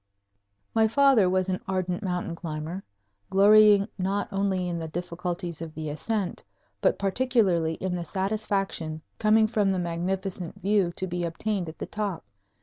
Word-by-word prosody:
My 220 0 +4
father 255 -5 +5
was 185 0 +1
an 185 -1 -2
ardent 185 -2 -1
mountain 180 -3 -2
climber, 165 +2 -5 0.5
glorying 205 +1 +6
not 195 +2 0
only 195 -2 0
in 170 -1 -2
the 160 - -4
difficulties 175 0 -4
of 160 -1 -7
the 155 -1 -4
ascent, 200 +4 -2 0.4
but - - +3
particularly 195 -6 +1
in 185 +1 -3
the 175 - -3
satisfaction 195 -4 -2 0.2
coming 220 0 +5
from 215 -2 +1
the 190 - +1
magnificent 180 +1 -3
view 200 -3 +2
to 185 - -3
be 175 -1 -3
obtained 175 +2 -2
at 160 - -11
the - - -4
top. 205 -5 -4
185 Hz, 150 wpm, -27 LUFS, 170-205 Hz, 0.5 s, glorying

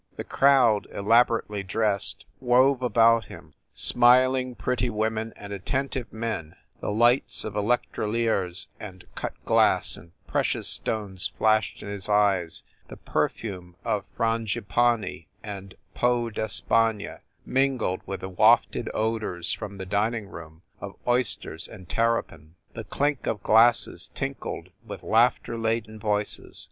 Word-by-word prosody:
The - - -5
crowd, 130 -6 +3
elaborately 110 -1 +2
dressed, 100 +1 0
wove 130 +1 +3
about 115 -2 +4
him, - - -13 0.2
smiling, 125 +1 +5
pretty 125 0 -1
women 110 0 -2
and 100 0 -9
attentive 130 +5 -3
men, 110 -8 -4 0.2
the - - -4
lights 120 +4 +3
of 110 - -5
electroliers 105 -3 -1
and 95 -3 -10
cut - - -5
glass - - +2
and 85 0 -15
precious - - -1
stones 100 -4 -1
flashed 110 -2 +1
in - - -8
his 100 0 -5
eyes, 100 -5 +2 0.2
the - - -11
perfume 90 -5 -3
of 105 - 0
frangipanni 115 -4 0 0.2
and 100 -2 -8 0.2
peau 120 -1 +1
d - - -4
Es 110 -2 0
pagne 115 -2 0 0.3
mingled 130 -8 0
with 95 - -5
the 95 - -5
wafted 90 - +3
odors, 110 -6 -1
from 100 -2 -7
the 95 - -6
dining] 105 +3 -1
room, 80 -2 -11 0.2
of 100 -1 -8
oysters 120 -9 0
and 95 -5 -13
terrapin. 85 -9 -2 0.2
The 115 - -7
clink 145 +6 -1
of 105 -3 -2
glasses 115 +2 +3
tinkled - - -5
with - - -9
laughter 115 0 +2
laden 110 -1 -2
voices. 105 -1 -2
110 Hz, 130 wpm, -25 LUFS, 100-120 Hz, 0.3 s, smiling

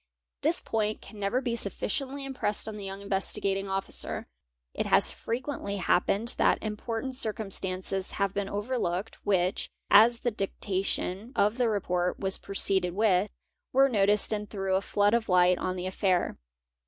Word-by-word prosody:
This - - +3
point 215 -1 -1
cai - - -13
never 205 +4 -1
be 240 -3 -1
sufficiently 270 +6 -2
impressed 255 -7 -2
on 220 - -5
the 205 - -7
young 195 +1 -6
Investigating 195 0 -1
Officer. 195 0 -3 0.5
It - - -2
hi - - +6
frequently 235 -4 -2
happened 200 +4 +1
that - - +4
important 225 +4 -4
circumstances 195 -4 -2
have 200 -1 0
been 200 -1 -2
overlookec 205 -2 -2
which, 185 -2 0 0.2
as 230 +3 +7
the 240 - 0
dictation 195 +2 -2
of 210 +5 +2
the 240 -2 +3
report 180 -4 -1
was 190 -1 +3
proceeded 190 -2 +1
with, 205 -2 +3 0.4
were 270 +1 +6
notice 205 -2 +3
and 210 -1 -2
threw 195 -2 -2
a 190 - +3
flood 205 +1 +2
of 235 -2 +1
light 180 0 +4
on 185 0 -2
the 180 0 -4
affair. 185 -1 0
200 Hz, 155 wpm, -28 LUFS, 190-225 Hz, 0.5 s, as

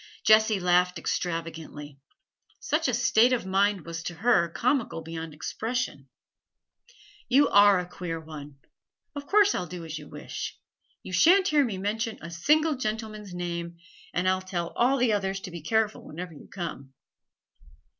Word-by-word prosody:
Jessie 215 -1 +5
laughed 180 0 +2
extravagantly; 160 -4 -4 0.6
such 305 +1 0
a 250 - 0
state 240 +1 +4
of 240 - -1
mind 195 -1 +1
was 165 -1 -5
to 175 0 -5
her 190 -3 +3
comical 235 - 0
beyond 165 0 -6
expression. 155 - -4 1.2
'You 275 +3 +5
are 205 -1 +6
a 180 - -2
queer 175 -3 -5
one! 150 -3 -10 0.6
Of 285 -1 -7
course 410 0 +5
I'll 180 - -3
do 175 0 -7
as 155 -1 -6
you 150 - -12
wish; - - -6 0.5
you 185 - -8
shan't 370 - +5
hear 295 -3 +4
me 220 -7 -3
mention 220 +3 -2
a 170 - -9
single 300 - +2
gentleman's 215 -4 -4
name, 170 -1 -4 0.3
and 180 +1 -1
I'll 185 0 +2
tell 175 -2 -3
all 255 +3 +2
the 245 -4 +2
others 195 -1 -1
to 185 - -8
be 170 -1 -7
careful 220 +6 0
whenever 175 +2 -8
you 145 - -14
come.' 150 -8 -7
185 Hz, 155 wpm, -27 LUFS, 170-230 Hz, 1.2 s, are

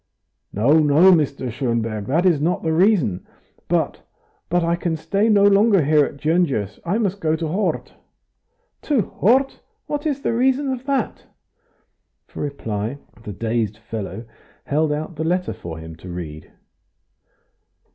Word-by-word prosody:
"No, 135 +10 +3
no, 155 +5 +6
Mr. 140 -6 +1
Schonberg, 115 -4 -2
that 165 +7 +1
is 165 -6 +3
not 170 +4 0
the 160 -1 0
reason. 165 - +2 0.4
But - - 0 0.5
but 175 0 +2
I 170 +1 +1
can 170 -1 -2
stay 200 +7 0
no 205 -2 +5
longer 200 -2 +5
here 150 0 +4
at 140 - -4
Gyongos, 145 - 0
I 175 +5 0
must 200 -3 -1
go 155 0 +1
to 160 0 -3
Hort." 190 +7 -2 0.9
"To 285 -7 +1
Hort? 260 +10 +1 0.3
What 295 +1 -3
is 285 -2 -2
the - - 0
reason 265 +3 +1
of 260 +1 -8
that?" 275 -1 -2 1.0
For - - -9
reply 115 -4 -3 0.3
the 105 - -6
dazed 110 0 -2
fellow 110 -1 -6 0.4
held 150 +1 +1
out 155 +2 -4
the 160 - -2
letter 180 +3 0
for 80 -2 -8
him 80 0 -9
to 90 +3 -11
read. 80 -3 -7
155 Hz, 150 wpm, -21 LUFS, -, 1.0 s, no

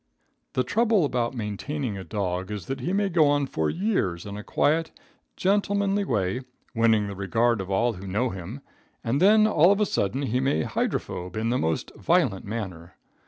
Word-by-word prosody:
The 130 - +1
trouble 220 - +2
about 125 -2 -1
maintaining 110 - -3
a 95 - -6
dog 95 -1 -3
is 105 -4 -5
that 135 0 -4
he 165 +8 -2
may 200 +1 +1
go 170 -5 +4
on 145 0 +2
for 80 - -1
years 170 - -1
in 100 0 -6
a 105 - -7
quiet, 160 +7 +1 0.5
gentlemanly 200 +1 +1
way, 105 - -1 0.3
winning 110 -2 +3
the 100 -1 -5
regard 115 +3 +1
of 95 - -7
all 115 +5 +1
who 95 0 -9
know 110 +6 0
him, 95 +9 -7 0.4
and 125 +5 0
then 215 +3 +6
all 180 -4 +5
of 200 - +2
a 210 - +3
sudden 130 - -1
he 125 -1 0
may 130 - +1
hydrophobe 90 +4 -3
in 115 +2 0
the 125 - +1
most 80 0 -1
violent - - +1
manner. 95 -6 -6
120 Hz, 185 wpm, -26 LUFS, 100-160 Hz, 0.5 s, then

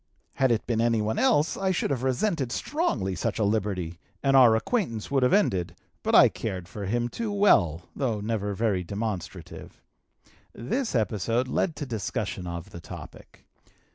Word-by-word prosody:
Had 130 -2 +2
it 115 - 0
been 115 -2 0
anyone 110 -2 +1
else 220 - +3
I 195 -1 -1
should 180 -5 0
have 130 -3 -1
resented 130 - 0
strongly 120 - -1
such - - -2
a 110 - +1
liberty, 95 -5 -1 0.2
and 135 0 +3
our 120 -4 +7
acquaintance 115 - -1
would 135 -1 +2
have 125 - +3
ended, 95 - +1 0.3
but - - +1
I - - +9
cared 90 -2 -5
for 100 0 -6
him 120 +3 0
too 220 - -4
well, 100 - +3
though 120 -7 -1
never 105 -1 -2
very 100 -3 0
demonstrative. 95 -3 -6 0.7
This 225 - -2
episode 115 +2 0
led 160 +5 0
to 145 - -4
discussion 105 -6 -3
of 85 +3 -6
the 85 - -9
topic. - - -11
115 Hz, 165 wpm, -26 LUFS, 95-135 Hz, 0.7 s, I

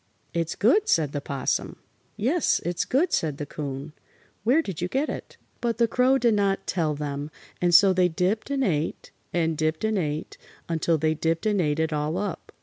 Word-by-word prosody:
"It's 165 -1 -1
good," 300 - +3
said 155 -4 +3
the 145 - -3
'Possum. 140 -2 -2 0.4
"Yes, 285 +11 +2
it's 175 0 -1
good," 320 +7 +1
said 150 -4 0
the 145 - -4
'Coon. 140 0 -6 0.5
"Where 265 +9 +3
did 185 - -5
you 180 - 0
get 270 +9 -1
it?" - - -7 0.2
But 235 -1 0
the 235 0 +3
Crow 255 +3 +3
did 240 -3 +3
not 200 -2 +1
tell 160 -5 0
them, 145 0 -4 0.3
and 175 -1 +3
so 190 +3 +7
they 180 -1 +4
dipped 185 +8 -1
and 275 -1 0
ate, 160 - -1 0.2
and 165 -2 +1
dipped 155 +3 -1
and 220 -2 +1
ate, 150 -2 -4 0.3
until 165 0 +1
they 155 +1 +1
dipped 165 +4 -1
and 205 -3 +2
ate 150 -1 0
it 160 0 0
all 150 +3 -1
up. 200 -2 -4
170 Hz, 195 wpm, -25 LUFS, 155-220 Hz, 0.5 s, so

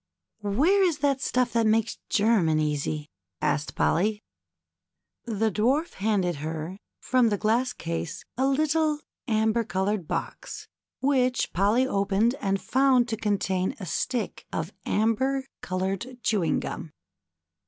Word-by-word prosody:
" - - -61
Where 275 - +3
is 340 -5 +2
that 275 -2 +1
stuff 250 -3 +1
that 230 -1 +3
makes 225 +1 +1
German 205 -8 +3
easy? 150 0 -2
" 85 -1 -60
asked 150 +1 -5
Polly. 210 +5 +1 1.0
The 220 -1 0
Dwarf 260 - +1
handed 190 -5 0
her, 160 +5 -5 0.2
from 250 -2 +3
the 205 - 0
glass 230 +5 +1
case, 170 -4 -5
a 265 +2 +2
little 305 +2 +2 0.3
amber 220 0 +2
colored 190 -1 -1
box - - -5 0.3
which 255 -2 +1
Polly 210 +8 +3
opened 200 0 +2
and 195 -1 0
found 260 0 +3
to 220 - 0
con 210 -2 0
tain 190 -1 -1
a 190 - -5
stick 230 - -2
of 165 +5 -3
amber 260 +5 +1 0.2
colored 190 +7 -3
chewing 200 -7 +1
gum. 165 -3 -6
215 Hz, 135 wpm, -26 LUFS, 185-255 Hz, 1.0 s, Where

